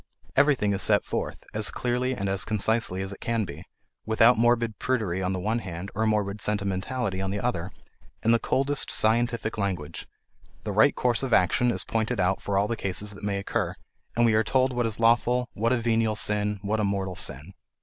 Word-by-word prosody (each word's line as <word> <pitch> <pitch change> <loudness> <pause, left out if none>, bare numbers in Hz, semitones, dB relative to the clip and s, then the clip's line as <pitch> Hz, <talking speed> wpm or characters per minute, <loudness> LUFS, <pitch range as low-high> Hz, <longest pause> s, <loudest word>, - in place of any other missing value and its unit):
Everything 130 -9 +3
is 100 - -2
set 105 -1 +3
forth, - - -4
as 105 0 0
clearly 125 +1 -1
and 100 -4 -3
as 95 0 0
concisely 110 -2 0
as 95 +1 -3
it - - -12
can 115 -2 -1
be 85 - -9 0.4
without 115 +2 +4
morbid 115 -1 +1
prudery 105 -8 -1
on 95 0 -1
the 95 - -2
one 110 +5 -1
hand, 90 -1 -7
or 110 +1 0
morbid 105 -1 0
sentimentality 100 +1 -2
on 95 - -2
the 100 +1 -2
other 95 -7 -2 0.5
in 115 - +3
the 115 - +4
coldest 140 +4 +1
scientific 115 0 +1
language; 90 -6 -3 0.6
the - - -3
right - - +4
course 125 -2 +1
of 130 -3 -2
action 100 +7 +3
is 120 - 0
pointed 110 -3 -1
out 95 +1 +1
for 100 -1 -1
all 100 +1 +2
the 115 - -2
cases 100 0 -2
that 100 - -12
may 100 -1 -1
occur, 100 - -2 0.4
and 120 - +4
we 115 - +3
are 110 +1 +3
told 130 +3 +1
what 120 -1 0
is 110 -1 -1
lawful, 120 +2 +3
what 115 +3 0
a 125 - +3
venial 115 -2 +1
sin, 105 0 +1
what 105 +2 -1
a - - +1
mortal 100 -2 -1
sin. 80 0 -3
110 Hz, 205 wpm, -26 LUFS, 100-115 Hz, 0.6 s, without